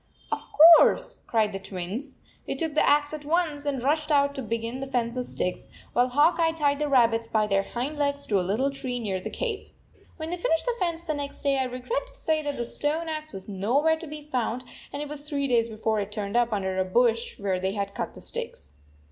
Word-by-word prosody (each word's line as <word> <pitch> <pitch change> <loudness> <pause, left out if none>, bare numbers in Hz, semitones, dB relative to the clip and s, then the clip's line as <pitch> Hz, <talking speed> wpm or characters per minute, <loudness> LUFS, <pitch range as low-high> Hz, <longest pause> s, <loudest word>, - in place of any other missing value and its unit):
" - - -29
Of - - -2 0.4
course," 295 - +2
cried 215 -3 +1
the 195 - -3
Twins. 195 +9 -6 0.3
They - - -2
took 320 -3 -2
the 310 - +3
axe 290 +1 +3
at 305 -1 -5
once 300 -2 0
and 270 -4 -1
rushed 300 +2 +1
out 280 -1 +3
to 275 - -4
begin 230 +1 -3
the 270 - -4
fence 240 -2 -1
of 250 -1 -3
sticks, 180 - -3 0.2
while 245 +1 +3
Hawk 295 +7 +3
Eye 325 -1 +3
tied 290 -3 +1
the 300 -1 0
rabbits 230 -4 +3
by 215 -1 +2
their 195 -1 +2
hind 255 +8 -4
legs 285 0 0
to 200 -3 +2
a - - +1
little 215 +10 0
tree 255 -2 -3
near 195 -5 -2
the - - -5
cave. 450 -5 -3 0.5
When 320 0 -5
they 355 - -2
finished 325 -2 0
the - - +1
fence 340 -2 -1
the 320 -2 -2
next 285 -1 -6
day, 275 -1 +2
I 260 - +1
regret 255 - -3
to - - -9
say 315 -9 0
the 285 -5 -3
stone 310 +6 -1
axe 310 0 -5
was 190 - -6
no 205 +5 0
where 320 +2 +3
to 330 - -6
be 300 0 -8
found, 250 -4 -2 0.3
and 285 +1 -4
it - - -6
was 295 0 -4
three 280 -1 0
days 235 -3 +3
before 220 -1 -1
it 200 0 -4
turned 210 0 -4
up 240 -1 +3
under 190 -2 -1
a - - +3
bush 230 +4 +1
where 195 -2 -1
they 190 +1 -1
had 200 -1 -3
cut - - -5
sticks. 70 0 -6
265 Hz, 240 wpm, -26 LUFS, 220-300 Hz, 0.5 s, the